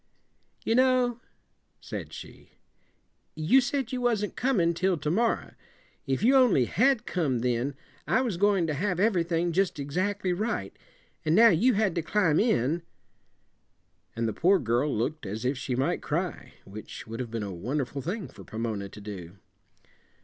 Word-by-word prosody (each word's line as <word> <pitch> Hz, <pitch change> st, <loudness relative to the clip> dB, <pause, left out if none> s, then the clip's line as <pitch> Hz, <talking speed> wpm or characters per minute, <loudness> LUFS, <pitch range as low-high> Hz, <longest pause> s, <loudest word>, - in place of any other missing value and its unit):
"You 225 Hz, -, +2 dB
know," 250 Hz, -1 st, +3 dB, 0.6 s
said -, -, -7 dB
she, -, -, -12 dB, 0.8 s
"you 160 Hz, +13 st, +4 dB
said 265 Hz, -1 st, -2 dB
you 255 Hz, -1 st, -2 dB
wasn't 225 Hz, -4 st, 0 dB
coming 195 Hz, -11 st, +2 dB
till 185 Hz, +1 st, +1 dB
to 150 Hz, +1 st, -2 dB
morrow. 230 Hz, +6 st, 0 dB, 0.5 s
If 135 Hz, +7 st, -1 dB
you 260 Hz, +4 st, +5 dB
only 240 Hz, -, +5 dB
had 235 Hz, -, +2 dB
come 140 Hz, -10 st, -1 dB
then 125 Hz, +3 st, -1 dB, 0.3 s
I -, -, +3 dB
was 230 Hz, -9 st, -2 dB
going 200 Hz, -2 st, +3 dB
to 155 Hz, -, -1 dB
have 180 Hz, +4 st, -1 dB
everything 175 Hz, -4 st, +1 dB
just 185 Hz, 0 st, +1 dB
exactly 185 Hz, +7 st, -1 dB
right 210 Hz, -, -3 dB, 0.5 s
an' 155 Hz, +1 st, +2 dB
now 230 Hz, +2 st, +8 dB
you 220 Hz, +7 st, +3 dB
had 205 Hz, -3 st, +2 dB
to 170 Hz, -, -1 dB
climb 165 Hz, -2 st, +2 dB
in 165 Hz, -, +1 dB, 0.7 s
" -, -, -45 dB
And 115 Hz, 0 st, -1 dB
the 110 Hz, -, -2 dB
poor 190 Hz, +4 st, +4 dB
girl 125 Hz, 0 st, 0 dB
looked 120 Hz, +3 st, -2 dB
as 110 Hz, +5 st, -5 dB
if 130 Hz, +3 st, +1 dB
she 130 Hz, -1 st, -3 dB
might 135 Hz, +8 st, 0 dB
cry, 160 Hz, -5 st, -3 dB
which 105 Hz, +2 st, -9 dB
would 115 Hz, +1 st, -7 dB
have 125 Hz, -2 st, -4 dB
been 115 Hz, -1 st, -3 dB
a 100 Hz, -2 st, -5 dB
wonderful 130 Hz, -, -3 dB
thing 190 Hz, -, -4 dB
for -, -, -13 dB
Pomona 110 Hz, -3 st, -4 dB
to 105 Hz, -, -12 dB
do. 95 Hz, -3 st, -8 dB
170 Hz, 165 wpm, -27 LUFS, 125-210 Hz, 0.8 s, now